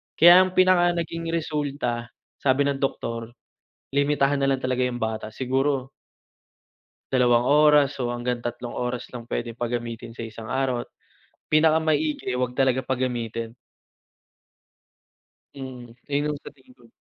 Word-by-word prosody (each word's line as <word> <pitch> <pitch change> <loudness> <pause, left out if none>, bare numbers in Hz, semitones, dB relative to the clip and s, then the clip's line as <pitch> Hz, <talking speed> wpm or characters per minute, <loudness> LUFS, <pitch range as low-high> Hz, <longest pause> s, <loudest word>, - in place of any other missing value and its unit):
Kaya 175 +3 +9
ang 185 0 -4
pinaka 180 -1 +4
naging 165 0 -3
resulta, 145 -7 -2 0.3
sabi 135 +1 +2
ng 140 -1 -1
doktor, 115 -3 -3 0.6
limitahan 140 0 +2
na 135 - +3
lang 135 - +1
talaga 130 0 0
'yung 125 -1 -2
bata. 110 -1 -3
Siguro 135 +1 -1 1.2
2 120 -2 +4
oras 150 -1 +5
o 120 - -1
hanggang 120 0 -3
3 120 0 -5
oras 125 0 -3
lang 120 - -6
pwedeng 115 -1 -3
pagamitin 120 -1 -4
sa 115 0 -7
isang 110 0 -9
araw 130 -3 0
at - - -25 0.6
pinakamaigi 155 -1 +2 0.2
'wag 125 -1 -1
talaga 130 -1 +2
pagamitin. 120 -3 -3 2.0
Mm, 125 -3 -9 0.2
yun 145 +1 +1
ang - - -10
sa - - -9
tingin 130 -3 -22
ko. 120 -2 -21
130 Hz, 135 wpm, -24 LUFS, 120-145 Hz, 2.0 s, Kaya